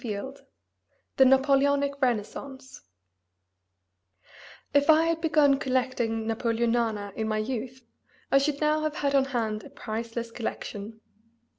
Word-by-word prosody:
XVII 225 +3 -4 0.8
THE 265 - +7
NAPOLEONIC 280 +1 +3
RENAISSANCE 260 +3 -3 1.9
If 285 +2 +3
I 315 +1 +7
had 330 0 0
begun 300 -4 +3
collecting 250 -4 -1
Napoleonana 230 -2 -1
in 220 -1 -2
my 215 0 -1
youth 250 +2 -4 0.5
I 275 - +6
should 285 +1 -1
now 305 0 +2
have 295 -2 -1
on 275 -1 +4
hand 225 -5 -2
a - - -11
priceless 230 +1 -5
collection. 220 -1 -6
255 Hz, 115 wpm, -27 LUFS, 225-280 Hz, 1.9 s, THE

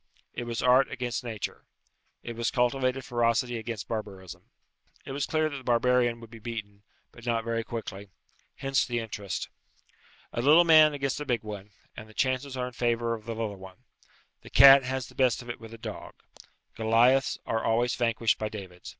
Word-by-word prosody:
It 120 - -5
was 115 -1 -3
art 130 +2 +5
against 125 -2 -3
nature. 110 -4 -5 0.6
It 120 - -6
was 115 0 -1
cultivated 130 +1 0
ferocity 120 0 0
against 110 -2 -6
barbarism. 100 -5 -7 0.6
It - - -7
was 140 +1 -2
clear 155 0 +1
that 145 -2 -5
the 130 - -10
barbarian 120 0 +2
would 115 -1 -13
be 115 - -11
beaten, 105 -3 -7 0.3
but 120 - -15
not 115 -1 0
very 115 0 -2
quickly. 105 -4 -7 0.5
Hence 135 0 +1
the 120 -1 -3
interest. 105 -4 -4 0.9
A 120 - -1
little 155 +7 +6
man 155 -3 +6
against 135 0 -2
a - - -1
big 120 -5 -1
one, 105 -1 -8 0.3
and 110 0 -10
the 110 - -17
chances 130 0 -1
are 125 - -1
in 125 - -7
favour 120 -1 0
of 110 -2 -7
the 115 -1 -4
little 110 -3 -4
one. 95 +5 -13 0.6
The - - -13
cat 135 0 +9
has 130 0 -3
the - - -14
best 130 -2 +1
of 120 - -6
it - - -9
with 115 -1 -11
a 115 - -9
dog. - - -8 0.6
Goliaths 120 +4 +3
are 115 0 -1
always 120 +2 +1
vanquished 115 -2 +1
by 110 - -2
Davids. 95 -4 -9
120 Hz, 190 wpm, -28 LUFS, 110-130 Hz, 0.9 s, cat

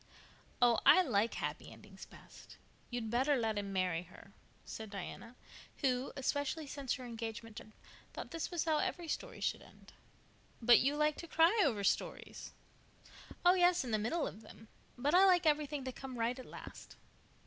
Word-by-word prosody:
"Oh 240 -1 +5
I 370 - +7
like 230 - +1
happy - - -4
endings - - -13
best. - - -15 0.3
You'd 235 -3 -4
better 265 +5 +2
let 220 -4 0
him 200 -1 -5
marry 185 -3 0
her," 180 +1 -16 0.3
said 220 -1 -7
Diana, 205 +4 -8 0.5
who, 255 -2 0
especially 285 +3 -1
since 275 -2 -3
her 255 - -8
engagement 225 -1 -6
to - - -8
Fred, 215 - -19 0.4
thought - - -8
this 330 -1 -3
was 345 -3 -2
how 315 -2 +2
every 365 -3 -2
story - - -5
should - - -1
end. - - -17 0.7
"But 240 0 +7
you 280 +3 +1
like 300 0 +1
to 335 - -8
cry 335 +7 +4
over 225 - 0
stories?" - - -2 0.9
"Oh, 355 - +8
yes, 355 -3 +4
in 245 - -5
the 215 - +1
middle 290 +9 -1
of 215 - -7
them. 220 0 -15 0.3
But 280 +5 0
I 370 +2 +7
like 360 -2 +4
everything 295 -2 +1
to 260 - -4
come 260 0 -8
right 235 +3 -1
at 255 - -10
last." - - -11
255 Hz, 180 wpm, -34 LUFS, 225-305 Hz, 0.9 s, Oh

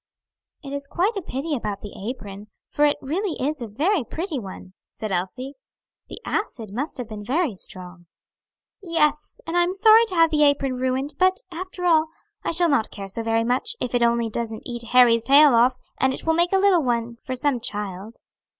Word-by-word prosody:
"It 275 -1 -7
is 280 0 -4
quite 385 +10 0
a 395 - -2
pity 300 0 -4
about 210 -5 -4
the 205 - -9 0.2
apron; 205 -5 -8 0.2
for 295 - +2
it 290 - +2
really 335 +6 -2
is 290 +1 -2
a 235 - -4
very 305 - 0
pretty 320 - -4
one," 190 -3 -10 0.2
said 215 -2 -6
Elsie, 210 +10 -3 0.6
"the - - -8
acid 230 - -3
must 275 +8 -3
have 250 -3 -5
been 215 -2 -8
very 285 - 0
strong." 180 -2 -7 0.7
"Yes, 300 -5 0
and 330 +2 -4
I 350 - +4
am 350 +1 +1
sorry 440 +3 +6
to 370 - -3
have 330 -1 +4
the 300 -1 +2
apron 275 -3 +2
ruined, 260 +3 -1
but 370 +2 +3
after 360 +1 -6
all, 320 -2 +4 0.4
I - - -1
shall 345 +1 +2
not 280 -8 +1
care 195 -1 -8
so 230 - -2
very 225 0 +1
much, 255 - 0
if 250 - -3
it 245 - +2
only 235 0 +2
doesn't 225 0 -5
eat 240 -1 -5
Harry's 240 -2 +6
tail 280 +3 +6
off, 245 +2 +4 0.2
and 265 0 +2
it - - -10
will 325 - +3
make 345 +2 +2
a 385 - +4
little 385 -3 +4
one 235 -3 -1
for 255 +2 -6
some 255 0 0
child." 210 -1 -5
265 Hz, 205 wpm, -23 LUFS, 230-330 Hz, 0.7 s, sorry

